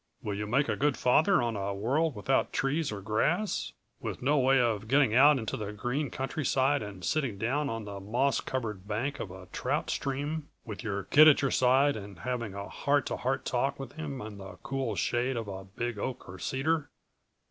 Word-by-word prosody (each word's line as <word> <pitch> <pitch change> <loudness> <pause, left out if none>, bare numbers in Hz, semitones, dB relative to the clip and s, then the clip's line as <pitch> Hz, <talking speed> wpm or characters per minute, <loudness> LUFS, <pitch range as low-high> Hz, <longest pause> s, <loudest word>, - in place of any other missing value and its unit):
Will 105 - -2
you 105 +1 -3
make 135 +6 +2
a - - 0
good 145 -1 +1
father 155 +5 +4
on 115 -2 -1
a 100 0 -2
world 135 +9 +1
without 130 +6 +1
trees 145 +2 0
or 100 -1 -5
grass, 150 - 0 0.3
with - - -5
no 145 +3 +2
way 135 +1 +4
of 110 -3 0
getting 135 -2 +4
out 140 +4 +7
into 110 -4 -3
the 105 -1 -4
green 125 +6 -2
countryside 135 0 0
and 100 -4 -7
sitting 135 -9 0
down 140 +7 0
on 115 -3 -4
the 100 -1 -6
moss 120 +6 +1
covered 110 -7 -4
bank 120 +7 -2
of - - -4
a 95 0 -10
trout - - -1
stream, 145 +3 -3 0.2
with 105 -1 -7
your 100 -3 -2
kid 150 +10 +7
at 150 -2 +6
your 135 - +2
side 135 +3 +4
and 100 -3 -8
having 120 -5 -3
a 100 0 -5
heart 145 -1 +1
to - - -2
heart 130 +2 -1
talk 135 +2 0
with 135 - -6
him 145 -4 -6
in 105 -2 -8
the 95 0 -9
cool 130 -3 -2
shade 120 +7 0
of 115 -2 -3
a 95 -1 -6
big 115 +3 -4
oak 130 +4 -4
or 90 0 -9
cedar." 150 - 0
125 Hz, 205 wpm, -30 LUFS, 105-140 Hz, 0.3 s, out